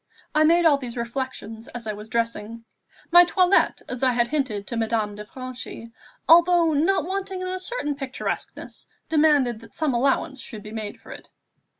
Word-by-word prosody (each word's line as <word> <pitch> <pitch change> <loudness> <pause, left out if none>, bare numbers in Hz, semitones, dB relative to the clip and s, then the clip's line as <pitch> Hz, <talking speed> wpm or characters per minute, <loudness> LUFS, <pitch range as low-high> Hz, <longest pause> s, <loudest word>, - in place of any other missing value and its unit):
I 310 0 +4
made 340 +2 +4
all 290 -3 +5
these 250 -2 -7
reflections 235 -2 -5
as 240 -1 -6
I 215 - -2
was 210 +1 -10
dressing. 230 0 -3 0.5
My 350 +1 +9
toilette, 365 +2 +2
as 250 - -5
I 255 -2 +3
had 240 0 +1
hinted 255 -9 -2
to 235 - -5
Madame 220 -2 -1
de 210 +1 -8
Franchi, 255 -1 -8 0.4
although 340 -1 +6
not 335 +7 +2
wanting 380 0 -4
in 370 - -4
a 370 0 -3
certain 370 -6 -3
picturesqueness, 270 -2 -6 0.2
demanded 295 -7 +3
that 230 - -16
some 305 -4 0
allowance 265 +1 0
should 215 -4 -8
be 210 - -9
made 215 -2 -6
for - - -14
it. - - -11
260 Hz, 180 wpm, -24 LUFS, 230-325 Hz, 0.5 s, My